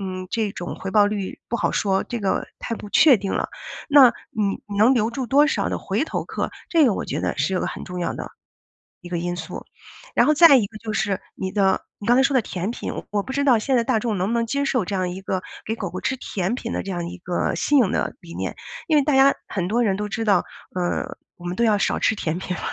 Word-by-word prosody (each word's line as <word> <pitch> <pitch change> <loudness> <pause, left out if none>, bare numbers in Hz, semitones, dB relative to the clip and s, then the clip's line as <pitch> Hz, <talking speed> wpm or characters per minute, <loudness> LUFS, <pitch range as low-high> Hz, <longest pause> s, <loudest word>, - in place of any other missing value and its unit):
嗯， 185 -1 -5
这 220 -3 0
种 175 -2 -5
回 195 - -5
报 205 0 +5
率 205 -2 -3
不 235 - -1
好 - - 0
说， 195 -2 +1
这 240 - -4
个 195 -2 0
太 230 - -4
不 210 - -9
确 280 0 +7
定 195 0 -4
了。 - - -1 0.4
那 275 -4 +8 0.2
你 205 -2 -1
你 200 -1 -5
能 235 +5 +6
留 225 -1 +1
住 255 +1 -4
多 280 +5 +5
少 305 - 0
的 - - -2
回 - - -1
头 - - -3
客， - - -3 0.2
这 330 -3 +5
个 220 - +2
我 - - -3
觉 - - -3
得 - - -2
是 - - +1
有 - - 0
个 - - -1
很 - - -6
重 180 0 -6
要 175 - -1
的， - - -6 0.7
一 175 - -10
个 175 - -2
因 175 +1 -2
素。 160 -2 -7 0.5
然 - - +5
后 305 - +5
再 315 -2 +8
一 225 - +2
个 215 +2 -10
就 215 -1 -5
是 195 -1 0 0.2
你 190 0 -4
的 195 -1 +2 0.2
你 205 - -7
刚 240 - +5
才 265 - +5
说 275 - +2
的 250 - +5
甜 190 +1 -4
品， - - -5 0.2
我 205 - +1
不 265 - -6
知 280 +1 +1
道 250 -5 +5
现 260 +4 0
在 235 - +2
大 230 -2 +1
众 215 -3 -1
能 185 - 0
不 - - -1
能 235 0 +1
接 280 +5 -1
受 255 -8 +1
这 200 - -3
样 185 -1 0
一 185 - -6
个 190 -1 -2 0.2
给 220 - -2
狗 200 -5 -4
狗 185 - -5
吃 260 - 0
甜 195 0 -2
品 230 -2 -5
的 - - -2
这 195 - -7
样 175 -1 -3
一 180 - -8
个 175 0 -1
新 290 -2 +3
颖 210 -6 +3
的 - - -1
理 170 -1 -11
念。 - - -3 0.3
因 315 - +3
为 285 - +4
大 295 - +1
家 270 +1 +6
很 185 -4 -2
多 235 +4 +1
人 195 -3 +1
都 210 - -3
知 225 +2 -2
道， 195 -4 +4 0.3
呃， 180 -1 -2 0.2
我 175 - -12
们 175 +1 -3
都 235 - +1
要 215 -3 +4
少 - - +1
吃 220 - +2
甜 165 -4 -2
品 180 -1 -4
了， - - -7
210 Hz, 300 characters per minute, -23 LUFS, 185-240 Hz, 0.7 s, 那